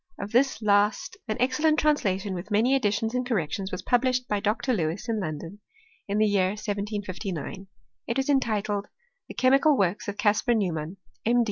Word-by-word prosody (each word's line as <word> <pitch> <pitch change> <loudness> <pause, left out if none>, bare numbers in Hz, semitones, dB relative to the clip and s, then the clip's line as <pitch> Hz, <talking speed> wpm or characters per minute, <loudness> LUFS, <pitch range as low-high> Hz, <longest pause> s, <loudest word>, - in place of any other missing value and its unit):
Of 200 +1 -6
this 250 -1 +2
last 210 - +2
an 215 - -2
excellent 300 +5 +2
translation, 205 -11 +1
with 180 +3 -6
many 225 +5 +3
additions 225 -3 +1
and 250 0 0
corrections, 195 - -2
was 185 - -5
published 255 0 +1
by 210 - 0
Dr. 215 +6 0
Lewis, 165 -3 -2
in 225 -2 0
London, 165 +2 -5 0.5
in 200 +1 -1
the 215 - +4
year 195 -2 +2
1759; 200 -3 -4 0.4
it 235 - -1
was 270 - 0
entitled, 210 -7 0 0.2
" - - -48
The - - -9
Chemical 275 +3 +4
Works 195 -1 0
of 205 0 -4
Caspar 220 +3 +2
Neumann, 175 -4 -2 0.3
M. 240 +2 +3
210 Hz, 170 wpm, -26 LUFS, 195-250 Hz, 0.5 s, the